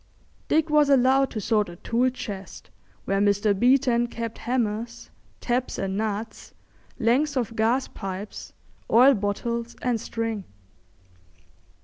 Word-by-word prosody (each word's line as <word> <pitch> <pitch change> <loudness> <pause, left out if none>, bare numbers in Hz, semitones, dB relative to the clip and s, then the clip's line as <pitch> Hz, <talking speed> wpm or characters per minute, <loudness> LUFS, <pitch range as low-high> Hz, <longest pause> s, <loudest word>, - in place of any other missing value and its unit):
Dick 315 0 +1
was 300 -1 +4
allowed 270 0 +4
to 220 - -5
sort 210 -1 +1
a 175 - -9
tool 240 +7 +1
chest 200 -6 -8 0.3
where 195 0 0
Mr. 205 +1 +3
Beeton 240 +2 +3
kept 230 -1 -6
hammers, 235 -1 -3 0.3
taps 250 +1 -1
and 190 0 -2
nuts, 215 +1 -4 0.4
lengths 270 +6 +1
of 230 -2 -2
gas 235 +4 +1
pipes, 195 +1 -7 0.4
oil 255 +4 +7
bottles, 235 +2 -3
and 240 -3 -1
string. 225 -4 -3
230 Hz, 120 wpm, -25 LUFS, 210-255 Hz, 0.4 s, oil